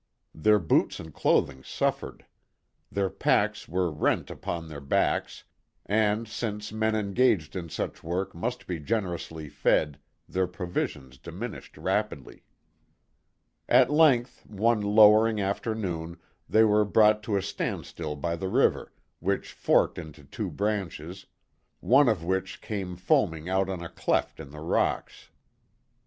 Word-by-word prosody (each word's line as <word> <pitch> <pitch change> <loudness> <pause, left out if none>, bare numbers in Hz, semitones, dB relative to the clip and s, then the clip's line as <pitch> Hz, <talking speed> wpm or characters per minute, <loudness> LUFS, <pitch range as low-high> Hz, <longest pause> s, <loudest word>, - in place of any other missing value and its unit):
Their 105 +7 +4
boots 85 -6 +1
and 80 -2 -9
clothing 65 -2 +1
suffered; - - -3 0.7
their 100 0 0
packs - - +1
were 90 0 0
rent 75 - 0
upon 85 -1 -5
their 75 -2 -8
backs, 70 - 0 0.4
and, 110 +1 +1
since 105 -1 -4
men 110 0 0
engaged 105 -5 +1
in 85 -3 -5
such - - -4
work 90 +4 -2
must 120 +9 -4
be 90 -3 -4
generously 85 -4 -3
fed, 75 +1 +1 0.3
their 95 0 0
provisions 85 -8 -4
diminished 95 - -8
rapidly. 95 - -2 1.3
At - - +5
length, 140 -6 +3
one 110 +2 +1
lowering 105 +1 +5
afternoon, 95 -5 -3 0.3
they 110 - +5
were 105 -1 +4
brought 105 +1 +4
to 105 -3 -1
a 95 - -1
standstill 80 -5 -4
by 85 +3 -2
the 95 +2 -4
river, - - +2 0.3
which 95 +3 -2
forked - - +2
into 80 -3 -10
two 70 - -5
branches, 95 -4 -3 0.5
one 135 +1 +5
of 100 -7 0
which 95 +2 -2
came 95 -4 -5
foaming 85 -2 +1
out 95 0 +1
on 90 -3 -4
a 85 - -6
cleft - - -1
in 75 -3 -9
the 75 +1 -10
rocks. 80 - -1
95 Hz, 135 wpm, -27 LUFS, 85-105 Hz, 1.3 s, At